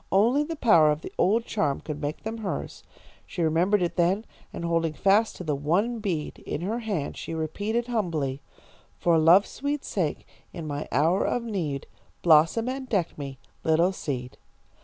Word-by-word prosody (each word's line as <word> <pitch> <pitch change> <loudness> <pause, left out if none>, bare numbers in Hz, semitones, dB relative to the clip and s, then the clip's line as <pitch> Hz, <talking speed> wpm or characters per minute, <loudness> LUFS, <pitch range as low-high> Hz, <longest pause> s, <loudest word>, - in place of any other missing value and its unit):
Only 235 +9 +4
the 325 +2 -4
power 170 - +5
of 150 +1 0
the - - -8
old 225 +4 +3
charm 175 -13 0
could 150 -1 -6
make 145 +1 -4
them 225 +1 -4
hers. 210 -3 -5 0.4
She 175 - -3
remembered 175 +5 +2
it 175 - -2
then, 185 +5 +2 0.3
and 170 - -5
holding 165 -1 +1
fast 205 +6 +3
to - - -7
the 155 -3 -1
one 185 +12 0
bead 175 -8 -3
in 150 - -5
her 215 +7 -2
hand, 200 -11 -3
she 165 - -5
repeated, 205 +9 -2
humbly: 165 - -2 0.6
"'For 170 -2 +3
love's 170 +5 +6
sweet 285 +1 -3
sake, 170 -7 -2 0.3
in 165 - -6
my 145 -1 -4
hour 165 +8 +3
of 245 - 0
need, 170 - -3 0.4
Blossom 165 +8 +5
and 260 0 -4
deck 185 -6 0
me, 140 -2 -7 0.3
little 165 +3 +3
seed.' 130 -8 -5
175 Hz, 175 wpm, -26 LUFS, 155-220 Hz, 0.6 s, love's